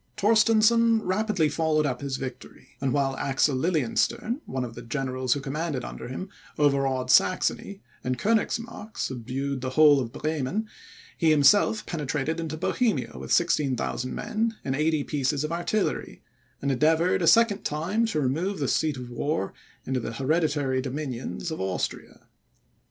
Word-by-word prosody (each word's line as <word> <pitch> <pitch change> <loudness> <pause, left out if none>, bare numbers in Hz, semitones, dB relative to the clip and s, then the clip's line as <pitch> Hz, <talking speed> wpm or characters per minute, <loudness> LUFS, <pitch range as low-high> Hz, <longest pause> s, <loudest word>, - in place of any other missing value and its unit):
Torstensohn 225 +1 +4
rapidly 190 -3 +1
followed 155 0 +1
up 125 -3 -2
his 140 -1 -3
victory; 130 -2 -8
and 135 -2 0
while 135 -1 +1
Axel 135 +1 +1
Lilienstern, 165 - 0
one 130 -1 -2
of 115 - -8
the 120 - -9
generals 130 0 -1
who 145 - -3
commanded 145 -1 -3
under - - -7
him, 130 +10 -5 0.3
overawed 135 -3 +2
Saxony, 190 +2 +2 0.2
and 125 0 -1
Koenigsmark 225 - -1
subdued 130 +2 -3
the 130 - -2
whole 145 +1 +6
of 120 -3 -3
Bremen, 155 - -2 0.5
he 165 - +3
himself 205 +9 +4
penetrated 150 0 -2
into 160 -1 -4
Bohemia 225 +7 0
with - - -7
16,000 135 -6 +1
men 225 +1 -1
and 130 - -1
80 155 0 +1
pieces 145 0 -1
of 155 - -3
artillery, 175 +5 -2 0.4
and 140 - +1
endeavoured 160 +7 +2
a 165 - +1
second 230 -1 +5
time 185 +10 0
to 180 -9 -1
remove 165 +9 -1
the 140 - -1
seat 155 0 +1
of 125 -1 -8
war 120 -4 -2 0.3
into 130 -1 -1
the 115 -1 -5
hereditary 145 -1 0
dominions 135 +3 -4
of 160 - -4
Austria. 95 -1 -4
150 Hz, 150 wpm, -26 LUFS, 130-185 Hz, 0.5 s, whole